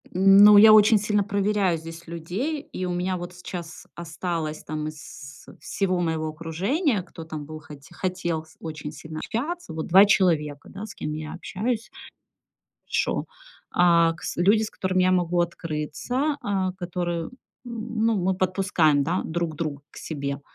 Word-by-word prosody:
Ну, 195 +3 +7
я 215 +1 +9
очень 215 +1 +7
сильно 210 0 +1
проверяю 200 -2 +1
здесь 165 +1 -10
людей. 185 - -3
И 185 -9 -6
у 180 - -2
меня 180 +1 -1
вот 175 0 -7
сейчас 175 -2 -8
осталось, 165 -2 -4
там, 155 0 -4
из 145 -2 -10
всего 185 -2 -1
моего 160 -2 -1
окружения, 190 - -1
кто 170 -2 -10
там 155 -2 -7
был, 155 +1 -8
хоте 145 0 -13
хотел 175 -3 -2
с 160 - -21
очень 155 -2 -6
сильно 155 +1 -8
общаться, 290 - -4
вот 160 0 -4
2 190 +3 +8
человека, 165 -8 +1
да, 200 +2 -7
с - - -9
кем 150 - -4
я 155 0 -6
общаюсь 220 +6 -3 1.0
еще. - - 0 0.5
А, 170 -2 +4
кс 170 - -6
люди, 205 +5 +4
с 215 - -4
которыми 185 -1 0
я 185 - +3
могу 175 -1 +1
открыться. 170 - -2
А, 190 -2 -1
которые 175 -2 -3
м, - - -8 0.4
ну, 230 -1 -1
мы 190 0 +1
подпускаем, 185 -6 +2
да, 170 +6 0
друг 165 -1 -3
друга 150 -3 -4
к - - -14
себе. 140 -2 -4
175 Hz, 160 wpm, -25 LUFS, 160-200 Hz, 1.0 s, я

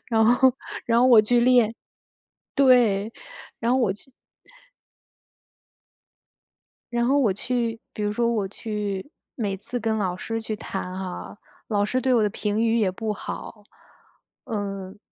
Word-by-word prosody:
然 220 -2 +3
后 245 +2 +5 0.3
然 230 0 +3
后 250 - +5
我 235 -4 +8
去 240 +3 +3
练 235 -2 +4 0.8
对， 235 -7 +4 0.5
然 235 +1 +1
后 260 - +3
我 235 -6 +2
就 260 +7 -15 2.8
然 235 0 +1
后 275 +3 +3
我 235 -8 +3
去 230 +2 -2
比 210 - -5
如 210 0 0
说 235 +2 +1
我 215 -4 0
去 210 +3 -4 0.3
每 205 -5 -2
次 245 +5 -4
跟 225 -1 0
老 185 -4 -1
师 225 +4 -4
去 220 - -3
弹 190 -3 -5
哈， 190 +2 -6 0.3
老 205 -2 +1
师 255 +5 0
对 260 +1 +1
我 235 -3 +4
的 210 - +3
评 210 +2 -1
语 230 0 +2
也 205 -4 +2
不 215 +3 -3
好。 210 +1 -7 0.8
嗯， 200 -4 -5
220 Hz, 160 characters per minute, -24 LUFS, 205-240 Hz, 2.8 s, 我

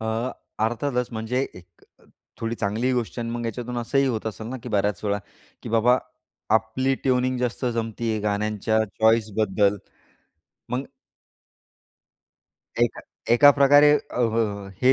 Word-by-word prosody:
अ, 110 +3 -2 0.3
अर्थातच 125 +2 -1
म्हणजे 115 +3 -2
एक 85 -1 -17
अ, - - -25 0.4
थोडी 115 0 -2
चांगली 115 +4 -1
गोष्ट 120 -1 -2
आहे 120 - -2
अन् 115 - -4
मग 120 - -4
याच्यातून 120 +2 -4
असंही 135 +4 +1
होत 115 -4 -2
असेल 110 0 -5
ना, 130 +3 -5
की 125 - -7
बऱ्याच 105 -3 0
वेळा, 100 0 0 0.4
की - - -7
बाबा, 115 +3 +4 0.6
आपली 110 +5 +1
ट्यूनिंग 130 -1 +1
जास्त 125 +1 -2
जमते 115 0 -2
आहे 110 - 0
गाण्यांच्या 105 +1 0 0.2
चॉईस 110 0 +4
बद्दल. 105 -1 +2 0.9
मग 125 +2 -1 2.0
एका - - +1 0.3
एका 145 +4 +8
प्रकारे 145 +1 +6
अ, - - -4
अ, 110 -4 0
हे, 130 +1 +6
115 Hz, 145 wpm, -24 LUFS, 110-125 Hz, 2.0 s, एका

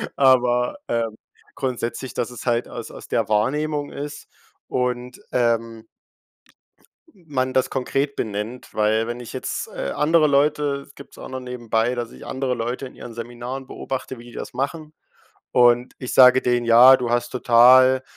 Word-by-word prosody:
Aber, 125 - +3
ähm, 115 -2 -1 0.4
grundsätzlich, 125 -1 -4
dass 120 +1 -2
es 120 - -9
halt 120 0 +1
aus - - -8
aus - - -11
der - - -1
Wahrnehmung 145 +7 0
ist 145 +1 -7 0.4
und, 125 0 -3
ähm 115 -2 0 1.3
man 140 -8 -3
das 130 - +1
konkret 135 +2 -2
benennt. 110 +3 -5
Weil 110 +1 +1
wenn 120 +1 -5
ich 120 - -9
jetzt, - - -4
äh, 70 - -5
andere 155 +1 +3
Leute 145 0 +1
gibt's 140 - -14
auch - - -9
noch 130 - -5
nebenbei, 125 -1 -1
dass 120 -1 -4
ich - - -12
andere 130 -1 -2
Leute 120 +3 -4
in - - -16
ihren 120 - -10
Seminaren 120 +3 -7
beobachte, 130 -2 -6
wie 120 - -13
die 120 - -13
das - - -7
machen 150 +4 -4 0.6
und 120 0 +4
ich 125 - -5
sage 130 0 +7
denen: 120 -1 +1
„Ja, 120 +3 +8
du 120 -2 -3
hast 120 0 0
total 130 +2 +5
125 Hz, 160 wpm, -22 LUFS, 120-135 Hz, 1.3 s, Ja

